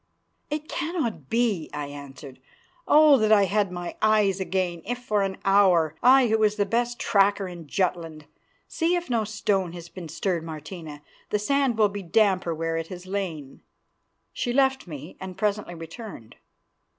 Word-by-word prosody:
"It 300 +1 -4
cannot 295 - -3
be," 225 -8 0
I 145 0 -3
answered. 140 -1 -10 0.5
"Oh! 300 -2 +7
that 215 -2 +2
I 205 -2 +6
had 200 0 0
my 175 -1 -6
eyes 210 -3 +3
again, 180 -2 -2
if 245 +4 -3
for 215 -4 -1
an 195 -1 -2
hour, 185 -6 +4
I 260 +1 +6
who 220 -1 +2
was 210 -1 +3
the 205 -1 +1
best 240 +3 -1
tracker 200 -3 +2
in 175 -3 -9
Jutland. 165 -3 -2 0.4
See 335 +2 0
if 350 -6 -3
no 230 -2 +2
stone 205 -4 -1
has 170 -1 -9
been 170 -1 -9
stirred, 170 +1 -2
Martina. 155 -1 -8 0.3
The 210 - +1
sand 265 +2 +1
will 210 -2 +4
be 200 0 -6
damper 185 -2 +2
where 165 +1 -2
it 165 0 -4
has 180 0 -9
lain." 180 -8 -5 0.7
She 245 - -2
left 265 -3 +2
me, 155 +1 -9
and 190 -1 -8
presently 210 -4 -1
returned. 165 - -10
195 Hz, 165 wpm, -25 LUFS, 165-220 Hz, 0.7 s, Oh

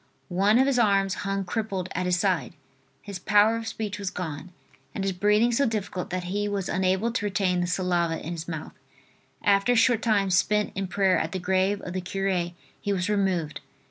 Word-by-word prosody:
One 195 +5 +3
of 260 - +5
his 270 -2 +2
arms 195 -4 +3 0.2
hung 195 -1 -1
crippled 195 -2 -3
at 180 +1 -1
his 180 0 +2
side; - - 0 0.5
his 200 -3 -7
power 210 +4 +4
of 225 -1 -6
speech 210 -2 -4
was 200 -2 -2
gone, 175 -1 -6 0.4
and 195 - -2
his 195 -1 0
breathing 210 +5 +3
so 275 +3 +2
difficult 205 -5 -3
that 180 0 -3
he 205 +4 -2
was 200 -2 -2
unable 190 +5 +1
to 230 - -2
retain 190 -3 +1
the 175 - -1
saliva 175 -2 0
in 165 - -6
his 165 -1 -6
mouth. 160 -2 -6 0.7
After 200 +4 +3
a - - +1
short 230 -1 +4
time 200 -4 +2
spent 210 +3 +2
in 195 0 -3
prayer 190 0 +2
at - - -3
the 185 - -2
grave 190 +2 +1
of 180 - -6
the 185 - -2
cure 190 -1 -1 0.3
he 205 - -2
was 190 +1 -1
removed. 190 -7 0
195 Hz, 205 wpm, -26 LUFS, 180-210 Hz, 0.7 s, of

